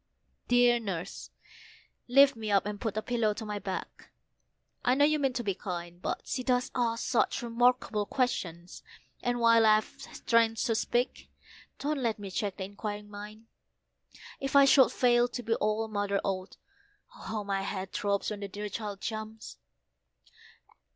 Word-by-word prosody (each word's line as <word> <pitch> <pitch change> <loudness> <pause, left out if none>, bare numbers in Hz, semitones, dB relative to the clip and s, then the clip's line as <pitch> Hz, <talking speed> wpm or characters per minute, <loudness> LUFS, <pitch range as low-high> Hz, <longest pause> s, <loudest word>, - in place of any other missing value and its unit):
Dear 245 0 +5
Nurse, 190 -5 -5 0.8
lift 275 +2 +6
me 220 -1 -5
up, 200 -1 +3
and 210 -1 -5
put 220 -2 -2
a 215 - -1
pillow 230 -4 0
to 220 - -6
my 210 -1 -4
back, 190 -2 -6 0.7
I 250 - +3
know 285 +2 +5
you 305 0 +2
mean 270 -2 +1
to 240 - -3
be 200 -3 0
kind; 175 -1 -6
But - - -2
she 255 - -2
does 250 -1 0
ask 230 -2 0
such 240 - +1
remarkable 235 -3 +1
questions, 175 -10 -2 0.4
and 245 0 -1
while 230 -1 +5
I've 215 -1 +5
strength 230 -1 0
to 235 - +1
speak, 240 +3 -1 0.5
don't 295 0 -2
let 230 -4 0
me 200 -2 -7
check 200 +1 -2
the 195 - -4
inquiring 205 +1 -6
mind. 210 +2 -9 0.9
If 270 0 -3
I 280 0 +8
should 270 -1 +6
fail 240 -1 +3
to 245 0 -6
be 225 - 0
all 215 0 0
a - - -5
mother 205 -2 -1
ought 190 -1 -3 0.6
oh, - - -14
how 215 -1 -4
my 195 -1 -1
head 195 -1 -4
throbs 200 +1 -1
when 210 - -5
the 200 - -5
dear 205 +2 -6
child 205 -1 -5
jumps!" 220 0 -6
220 Hz, 170 wpm, -30 LUFS, 205-245 Hz, 0.9 s, I